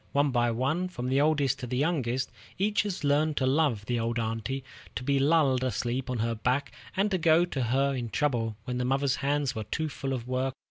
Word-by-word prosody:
One 145 0 +3
by 120 -1 +2
one, 135 +10 0
from 125 -9 -4
the 135 +2 +3
oldest 145 -3 +2
to 125 - -5
the 125 +1 -2
youngest, 130 -4 0 0.3
each 205 +3 +2
has 200 -6 -4
learned 145 +1 +2
to 130 - +2
love 130 -6 +2
the 120 +1 -1
old 115 +1 -1
aunty, 115 +3 -2 0.3
to - - -3
be 140 +1 +2
lulled 140 -3 +3
asleep 125 0 -2
on 125 - -1
her 115 +1 0
back, 125 +5 0 0.3
and 205 +2 +2
to 185 - +1
go 165 +1 +5
to 145 -6 -3
her 135 +4 +2
in 120 -3 -3
trouble 115 -5 0
when 125 0 -3
mother's 135 0 +1
hands 140 -1 0
were 110 -4 -4
too 155 +6 -2
full 135 -1 -4
of 125 -2 -4
work. 130 +1 -1
135 Hz, 220 wpm, -28 LUFS, 125-145 Hz, 0.3 s, go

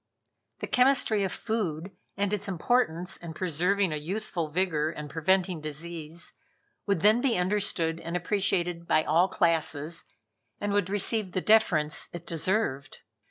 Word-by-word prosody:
The - - -1
chemistry 250 -5 +3
of 190 - -1
food 190 -6 -3 0.3
and 200 0 0
its 205 -1 -2
importance 180 -2 0
in 165 -2 -9
preserving 180 +2 +1
a - - -2
youthful 170 0 -3
vigor 155 -2 0
and 150 -2 -7
preventing 180 +2 +1
disease, 160 +2 -5 0.5
would 200 -5 +1
then 215 +5 +5
be 250 -6 +2
understood 180 -3 0
and 170 +1 -3
appreciated 175 -2 -1
by 155 -2 +3
all 165 +5 +3
classes, 160 -1 0 0.5
and 205 0 -2
would 200 -2 +1
receive 205 -1 +1
the - - +1
deference 170 -9 +3
it 170 -1 -7
deserved. 165 -4 -1
175 Hz, 140 wpm, -28 LUFS, 160-200 Hz, 0.5 s, then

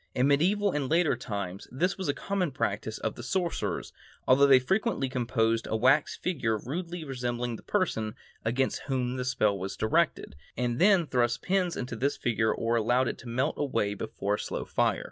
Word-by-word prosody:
In 125 +2 +3
medieval 195 +8 +3
and 145 -5 -2
later 165 -4 +3
times 100 -6 -5
this 180 +9 0
was 190 - -4
the 145 - 0
common 195 -4 -1
practice 110 -4 -2
of 110 - -2
the - - -9
sorcerers, 170 - -2 0.3
although 140 +2 +6
they 135 -2 +8
frequently 190 - 0
composed 115 -3 0
a - - -1
wax 130 +6 +3
figure 120 -11 -1
rudely 170 - -5
resembling 120 -3 -3
the - - -10
person 110 - -1 0.3
against 125 +4 0
whom 130 -2 -1
the 125 - -2
spell 110 -5 +1
was 95 +2 -5
directed, 155 - +1 0.2
and 120 0 -1
then 190 -2 +5
thrust 120 -4 0
pins 180 -2 +1
into 125 -2 -4
this 135 +5 0
figure 110 -2 +1
or 115 +1 0
allowed 120 +3 +2
it - - -6
to 120 - -9
melt 125 +3 0
away 115 -8 0
before 100 0 -3
a 105 - -1
slow - - -4
fire. - - +1
130 Hz, 185 wpm, -28 LUFS, 115-160 Hz, 0.3 s, they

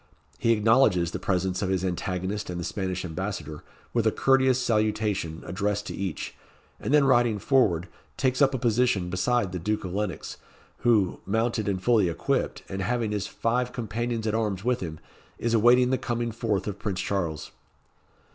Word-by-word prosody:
He 115 - +3
acknowledges 110 -6 +4
the 90 - -4
presence 95 0 -1
of 95 - -1
his 95 -1 0
antagonist 95 +3 -3
and 90 -1 -4
the - - -3
Spanish 95 0 -3
Ambassador, 90 -3 -5 0.3
with 115 -2 +2
a - - +4
courteous 130 0 +3
salutation 105 -7 0
addressed 100 +3 -1
to - - -5
each, 95 -6 -4 0.5
and - - -3
then 150 -1 +6
riding 120 -5 +3
forward, 100 - +2 0.3
takes 130 0 +1
up 135 -1 +4
a - - 0
position 115 -6 +1
beside 95 +2 +1
the 90 - -4
Duke 105 +4 -2
of 90 - -5
Lennox, 100 -4 -3 0.4
who, 110 -6 +2
mounted 110 +1 0
and 95 -2 -2
fully 110 -7 +4
equipped, 85 - -1
and 95 0 -4
having 120 +1 -1
his 105 -1 -2
five 125 +2 -1
companions 115 0 -3
at 110 - 0
arms 105 -4 -1
with 125 +1 +1
him, 80 -3 -6 0.4
is 115 0 -1
awaiting 120 +3 +5
the 130 - +1
coming 120 -2 -2
forth 110 -3 -1
of 100 -1 -5
Prince 95 -3 -3
Charles. 85 -6 -2
105 Hz, 175 wpm, -26 LUFS, 95-120 Hz, 0.5 s, then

